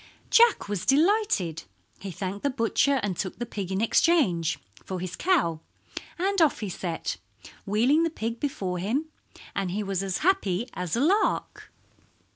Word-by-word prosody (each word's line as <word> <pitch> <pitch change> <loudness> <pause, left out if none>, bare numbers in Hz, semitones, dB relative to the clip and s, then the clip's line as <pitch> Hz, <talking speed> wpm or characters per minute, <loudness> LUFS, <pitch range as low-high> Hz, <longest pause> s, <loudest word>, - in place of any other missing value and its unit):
Jack 470 - +5
was 205 -3 -3
delighted. 290 - +2 0.4
He 195 - -6
thanked 190 +3 -5
the 285 - +1
butcher 265 +2 +1
and 200 -3 -1
took 185 +1 -4
the 240 - -3
pig 200 -5 -5
in 190 +2 0
exchange 220 - +2 0.3
for 185 -1 -5
his 180 0 -5
cow, 290 - +1 0.6
and 390 +1 +1
off 310 -7 +3
he 210 - -3
set, 175 -2 -4 0.5
wheeling 240 +10 +3
the 330 - +2
pig 230 -6 -4
before 195 -12 -2
him, 260 - -1 0.5
and 195 -2 -1
he 205 +4 -2
was 195 -2 -2
as 190 -2 -2
happy 240 - +1
as 180 -2 -3
a 235 - 0
lark. 385 +9 0
210 Hz, 160 wpm, -26 LUFS, 185-305 Hz, 0.6 s, Jack